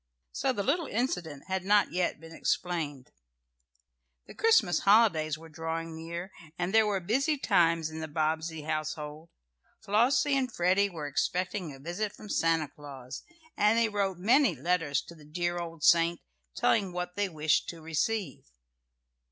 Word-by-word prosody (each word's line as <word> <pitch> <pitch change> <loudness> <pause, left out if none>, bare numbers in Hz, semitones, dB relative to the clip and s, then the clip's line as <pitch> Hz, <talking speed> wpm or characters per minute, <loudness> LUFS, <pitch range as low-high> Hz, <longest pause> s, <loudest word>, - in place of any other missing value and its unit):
So 265 - 0
the 205 -5 -2
little 310 - 0
incident 180 - -2
had 190 -1 -2
not 205 +2 +3
yet 180 -3 -1
been 165 +1 -12
explained. 155 -7 -2 1.1
The - - -12
Christmas 320 - +3
holidays 195 -8 +4
were 165 +1 -13
drawing 165 0 -5
nearer, 170 +3 -6 0.3
and 180 +2 -2
there 220 -1 +5
were 200 -2 0
busy 270 - +1
times 165 - +2
in 160 - -6
the 160 - -4
Bobbsey 160 +1 -2
household. 155 +1 -4 0.6
Flossie 245 +7 +3
and 260 -2 0
Freddie 190 +2 +2
were 160 -5 -6
expecting 180 +4 -2
a 135 - -11
visit 175 +9 -4
from 210 - -12
Santa 165 -4 +1
Claus, 135 -3 -9 0.3
and 210 +2 +3
they 230 -1 +3
wrote 200 -3 -1
many 230 - +3
letters 165 -6 0
to - - -12
the 155 -3 -16
dear 175 +3 -2
old 165 -3 -7
saint, 170 0 +4 0.4
telling 195 -4 +2
what 180 0 -4
they 205 0 0
wished 155 -2 +1
to 170 - -7
receive. 170 - -2
175 Hz, 155 wpm, -29 LUFS, 160-205 Hz, 1.1 s, there